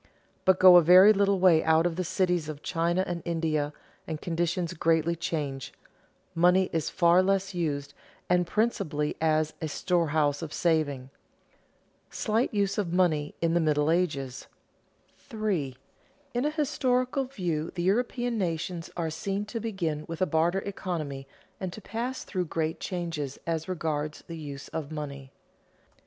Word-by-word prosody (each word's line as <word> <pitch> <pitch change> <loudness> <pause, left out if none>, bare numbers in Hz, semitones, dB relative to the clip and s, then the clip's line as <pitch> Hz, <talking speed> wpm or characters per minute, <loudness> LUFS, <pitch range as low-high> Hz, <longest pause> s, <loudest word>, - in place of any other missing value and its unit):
But 190 -1 +5
go 185 -1 +9
a - - +8
very 185 +5 +8
little 200 -1 +2
way 175 -4 +5
out 160 +1 +3
of 175 -2 0
the 185 - -1
cities 175 -3 0
of 150 -1 -7
China 170 +2 0
and 175 -1 -4
India, 160 -3 -1 0.4
and 160 -2 -4
conditions 170 +1 -1
greatly 165 0 +1
change; 145 -5 -4 0.6
money 180 +2 +3
is 160 -2 0
far 175 0 +4
less 195 0 0
used 150 -5 -2 0.3
and 180 -1 +2
principally 175 -9 0
as 155 -1 +2
a 160 - -1
storehouse 155 -3 +1
of 160 -2 -6
saving. 145 -6 0 1.0
[Sidenote: - - -24
Slight 225 +3 0
use 200 -2 0
of 185 -5 -1
money 165 -5 +1
in 165 0 +2
the 175 - +3
Middle 150 -1 +2
Ages] 140 -7 -1 0.7
3. 195 - -3 0.6
_In 245 +4 +1
a - - +2
historical 270 -3 0
view 175 - -3
the 175 - -2
European 240 +4 0
nations 170 -1 -3
are 165 -2 -1
seen 195 +5 -3
to 230 +2 -5
begin 175 -9 -3
with 165 -1 -6
a 185 - +3
barter 170 +3 +1
economy 155 -9 -4 0.3
and 185 -2 -4
to - - -8
pass 235 +5 -4
through 180 -2 -2
great 160 0 -2
changes 165 -6 -4
as 165 0 -2
regards 155 -4 -3
the 165 - -7
use 145 -2 -7
of 155 -2 -5
money. 140 -3 -6
170 Hz, 155 wpm, -28 LUFS, 155-190 Hz, 1.0 s, go